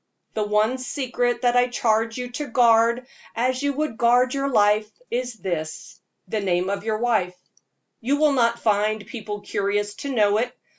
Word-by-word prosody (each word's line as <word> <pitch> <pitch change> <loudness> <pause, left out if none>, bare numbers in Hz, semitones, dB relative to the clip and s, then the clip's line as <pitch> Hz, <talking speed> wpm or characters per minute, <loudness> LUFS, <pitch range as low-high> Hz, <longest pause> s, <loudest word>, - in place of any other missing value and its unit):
The 215 - -1
only 215 +5 +1
secret 245 -2 -2
that 245 0 +3
I 245 0 +4
charge 225 -2 0
you 250 -1 -5
to 295 +4 -4
guard 235 0 +3 0.3
as 255 +3 0
you 285 0 +1
would 300 -4 -3
guard 245 +2 +4
your 275 0 -1
life, 210 -2 +3 0.2
is 245 -1 -2
this 170 -7 -5 0.3
the 220 - -2
name 185 -1 0
of 200 - -3
your 220 -1 -1
wife. 205 -6 0 0.6
You 270 +5 0
will 300 -1 +3
not 235 -3 +2
find 215 -1 0
people 210 -3 -6
curious 205 +1 -1
to 280 +5 -5
know 210 -4 +3
it. 245 +2 -3
230 Hz, 170 wpm, -23 LUFS, 210-250 Hz, 0.6 s, I